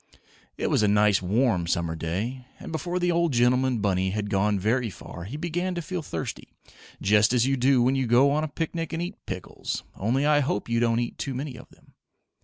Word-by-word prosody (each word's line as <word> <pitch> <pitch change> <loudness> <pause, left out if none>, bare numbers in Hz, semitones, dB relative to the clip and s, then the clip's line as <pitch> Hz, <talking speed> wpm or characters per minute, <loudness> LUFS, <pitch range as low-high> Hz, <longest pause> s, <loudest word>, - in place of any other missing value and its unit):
It - - -1
was - - +3
a 105 - +3
nice 105 -1 +4
warm 95 -2 +1
summer 85 -1 -1
day, 105 +11 -4
and - - -8
before 175 +3 -2
the 175 -1 +1
old 170 -3 +1
gentleman 125 +1 +3
bunny 95 -2 +1
had 105 +1 -3
gone 100 +1 +2
very 115 +5 0
far 90 -2 -9
he 125 +10 -6
began 175 +3 -2
to 175 - -2
feel 180 +1 -4
thirsty, 85 - -6 0.5
just 105 +3 +4
as 120 -1 +3
you 135 +1 +2
do 130 -1 +3
when 130 +2 +3
you 135 -2 0
go 125 +4 +5
on 150 +2 +1
a - - -1
picnic 165 +2 -4
and 165 - -2
eat 180 +4 -7
pickles, - - -5
only 125 +8 0
I 150 0 +4
hope 130 -7 -1
you 115 0 +1
don't 115 -1 +2
eat 120 - -4
too 135 - -3
many 135 0 -4
of - - -12
them. - - -23
125 Hz, 215 wpm, -26 LUFS, 105-145 Hz, 0.5 s, go